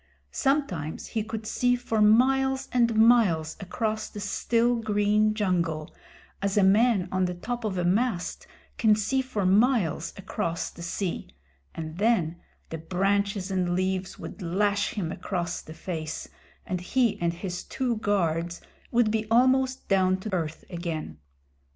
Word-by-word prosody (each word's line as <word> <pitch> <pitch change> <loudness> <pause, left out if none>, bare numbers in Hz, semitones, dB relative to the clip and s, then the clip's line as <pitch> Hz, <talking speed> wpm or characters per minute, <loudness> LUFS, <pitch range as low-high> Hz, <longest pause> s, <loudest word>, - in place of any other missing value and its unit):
Sometimes 230 - -1
he 220 -2 -1
could 220 0 -6
see 245 +3 +2
for 230 -3 -1
miles 265 +5 +4
and 235 -2 +2
miles 215 -9 +4
across 215 +3 -2
the 210 - -8
still 235 +4 +1
green 215 -1 +2
jungle, 170 -7 -1 0.5
as 200 +1 0
a 205 - +5
man 200 0 +4
on 185 0 +1
the 180 0 -3
top 240 +6 -4
of 205 -4 -2
a 180 - 0
mast 190 0 0 0.3
can 215 -2 +5
see 240 +6 0
for 235 -7 -3
miles 195 - +2
across 190 -3 -3
the - - -12
sea, 170 +1 -3 0.5
and 160 +1 -6
then 200 -7 +2 0.3
the 165 - -5
branches 195 +3 0
and 180 -2 0
leaves 185 0 -1
would - - -9
lash 200 +5 0
him 175 -6 -2
across 175 -1 -3
the 155 - -11
face, 160 -3 -5 0.4
and 180 -1 -3
he 225 0 +1
and 170 -1 +1
his 180 +1 -5
two 245 -3 -2
guards 175 -5 0 0.3
would 235 -2 +3
be 220 -1 -1
almost 260 +2 +3
down 185 -1 +3
to 190 +2 -6
earth 160 -3 -3
again. 165 - -5
200 Hz, 150 wpm, -27 LUFS, 175-225 Hz, 0.5 s, a